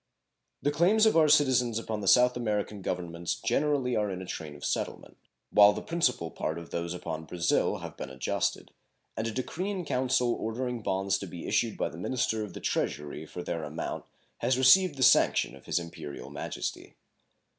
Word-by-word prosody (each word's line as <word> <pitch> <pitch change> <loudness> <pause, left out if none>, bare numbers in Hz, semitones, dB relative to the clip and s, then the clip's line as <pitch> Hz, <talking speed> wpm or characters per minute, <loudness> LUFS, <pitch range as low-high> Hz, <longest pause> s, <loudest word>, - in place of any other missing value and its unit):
The 145 - +2
claims 185 +9 +4
of 220 - +4
our 155 -2 +5
citizens 130 -6 +4
upon 110 -2 -3
the 100 - -4
South 125 +4 +6
American 105 -3 -2
Governments 85 +1 -3
generally 125 +2 0
are 105 -1 +1
in 95 -1 -4
a 95 - -7
train 80 -4 -6
of 75 - -8
settlement, - - -3 0.4
while 105 0 +7
the - - -5
principal 125 - 0
part 80 - -3
of 85 0 -9
those 85 +1 -3
upon 80 -2 -5
Brazil 85 +1 +1
have - - -9
been - - -6
adjusted, 65 -1 -2 0.4
and 110 - -2
a - - -2
decree 160 - -3
in 190 -4 -3
council 125 -2 +1
ordering 120 +2 -3
bonds 95 -1 0
to 100 - -6
be 85 -1 -8
issued - - +1
by - - -1
the 80 - -10
minister 110 +1 -1
of 100 -4 -7
the - - -7
treasury 75 +1 -2
for 90 - -7
their 85 -2 -3
amount 75 +2 -5 0.3
has 125 +2 +1
received 145 +5 +6
the 130 - +1
sanction - - +4
of - - -16
His - - 0
Imperial 85 -4 -6
Majesty. - - -5
110 Hz, 190 wpm, -29 LUFS, 85-130 Hz, 0.4 s, while